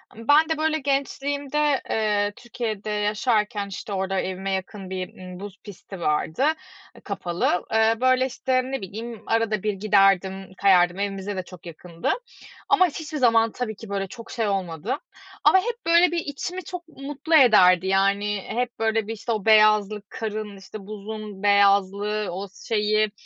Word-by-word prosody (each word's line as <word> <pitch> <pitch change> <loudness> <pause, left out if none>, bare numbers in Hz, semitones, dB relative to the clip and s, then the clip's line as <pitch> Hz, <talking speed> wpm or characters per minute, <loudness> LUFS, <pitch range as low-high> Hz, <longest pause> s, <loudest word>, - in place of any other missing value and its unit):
Imm, 230 +1 -11
ben 310 +3 +5
de 320 - 0
böyle 315 0 +1
gençliğimde, 280 +1 0
eee, 205 -2 +1
Türkiye'de 220 -3 -5
yaşarken 210 0 0
işte, 200 +1 -7
orada 190 0 -1
evime 190 +1 -3
yakın 190 0 -4
bir, 185 -1 -5
ııı, 180 -1 -9
buz 200 0 -8
pisti 195 -1 -10
vardı. 160 - 0 0.5
I - - -15
kapalı. 180 -3 -1 0.4
Böyle 255 0 +4
işte, 260 0 0
ne 270 +1 -4
bileyim, 220 +4 -7
arada 225 -3 0
bir 210 -1 0
giderdim, 195 -1 +2
kayardım. 180 -2 +4
Evimize 200 0 -3
de 185 - -2
çok 180 -2 -14
yakındı 170 0 -4 0.6
ama 370 -3 +5
hiçbir 310 -1 -6
zaman 230 -4 +4
tabii 220 -3 -4
ki 220 0 -11
böyle 195 -1 -2
çok 230 +4 -11
şey 230 -3 -1
olmadı 195 - -2 0.5
ama 380 - +6
hep 475 +4 -4
böyle 340 +1 +5
bir 345 - -1
içimi 335 +5 -5
çok 350 0 -8
mutlu 295 +2 -2
ederdi. 190 - +6
Yani, 200 +1 +1
hep 245 0 -3
böyle 225 -1 0
bir 225 - -3
işte, 225 +2 -5
o 215 -3 -2
beyazlık, 215 -1 +4
karın 215 -2 -5
işte, 195 +1 -11
buzun 210 -1 -7
beyazlığı, 200 +1 +3
o 190 +3 -5 0.2
şeyi, 215 -1 +1
210 Hz, 155 wpm, -24 LUFS, 195-245 Hz, 0.6 s, ama